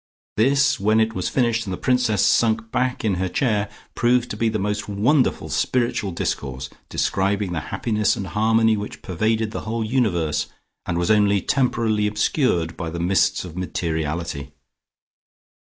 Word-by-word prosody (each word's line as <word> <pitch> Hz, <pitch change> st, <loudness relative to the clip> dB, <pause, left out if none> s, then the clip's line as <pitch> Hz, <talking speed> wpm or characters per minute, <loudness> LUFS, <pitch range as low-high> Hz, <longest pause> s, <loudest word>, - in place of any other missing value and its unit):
This, 135 Hz, +5 st, +3 dB
when 110 Hz, +3 st, +3 dB
it 110 Hz, 0 st, +1 dB
was 90 Hz, -3 st, -2 dB
finished 115 Hz, -4 st, 0 dB
and -, -, -3 dB
the -, -, -4 dB
Princess 125 Hz, -5 st, +2 dB
sunk 115 Hz, 0 st, +2 dB
back 125 Hz, -2 st, -1 dB
in 105 Hz, -, +2 dB
her 95 Hz, -, 0 dB
chair, 105 Hz, -2 st, 0 dB, 0.2 s
proved 120 Hz, 0 st, +1 dB
to -, -, -3 dB
be 115 Hz, +1 st, +1 dB
the 110 Hz, -, -1 dB
most 105 Hz, +1 st, -2 dB
wonderful 120 Hz, +8 st, +1 dB
spiritual 120 Hz, -5 st, 0 dB
discourse, 65 Hz, -6 st, -4 dB, 0.2 s
describing 100 Hz, 0 st, 0 dB
the 85 Hz, -, -1 dB
happiness 105 Hz, -3 st, 0 dB
and 100 Hz, -, -4 dB
harmony 110 Hz, +2 st, +2 dB
which 105 Hz, 0 st, -6 dB
pervaded 110 Hz, +4 st, 0 dB
the -, -, -4 dB
whole 115 Hz, +1 st, -3 dB
universe, 85 Hz, -, 0 dB, 0.4 s
and 85 Hz, -, -1 dB
was 85 Hz, +3 st, +1 dB
only 100 Hz, -1 st, +4 dB
temporarily 115 Hz, -3 st, +1 dB
obscured 105 Hz, -, 0 dB
by 85 Hz, -2 st, -4 dB
the 85 Hz, +1 st, -5 dB
mists 90 Hz, +1 st, +1 dB
of 85 Hz, -3 st, -9 dB
materiality. 80 Hz, -4 st, -3 dB
105 Hz, 155 wpm, -22 LUFS, 90-115 Hz, 0.4 s, only